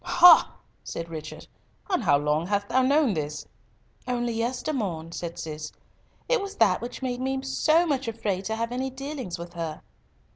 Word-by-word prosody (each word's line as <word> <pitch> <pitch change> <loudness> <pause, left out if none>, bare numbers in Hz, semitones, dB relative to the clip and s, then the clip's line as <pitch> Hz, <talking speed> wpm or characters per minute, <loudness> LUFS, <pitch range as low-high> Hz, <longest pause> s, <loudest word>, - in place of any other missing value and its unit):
"Ha!" 350 -1 +7 0.3
said 165 0 -6
Richard, 155 -1 -7 0.4
"and 370 -8 +1
how 145 -6 +5
long 150 +3 0
hast 205 0 -1
thou 260 - +3
known 275 -2 +3
this?" 150 -2 -4 0.6
"Only 240 -1 -1
yestermorn," 225 - -2
said 170 -1 -5
Cis; 155 -1 -6 0.6
"it - - +2
was 400 0 -6
that 185 - +3
which 245 +2 -6
made 250 -1 -2
me 265 +1 -1
so 315 +5 +3
much 275 -6 -1
afraid 205 -4 -2
to 220 - -1
have 230 +1 -2
any 260 +2 -2
dealings 265 - -5
with 170 +1 -8
her." 165 -3 -5
230 Hz, 170 wpm, -26 LUFS, 170-265 Hz, 0.6 s, Ha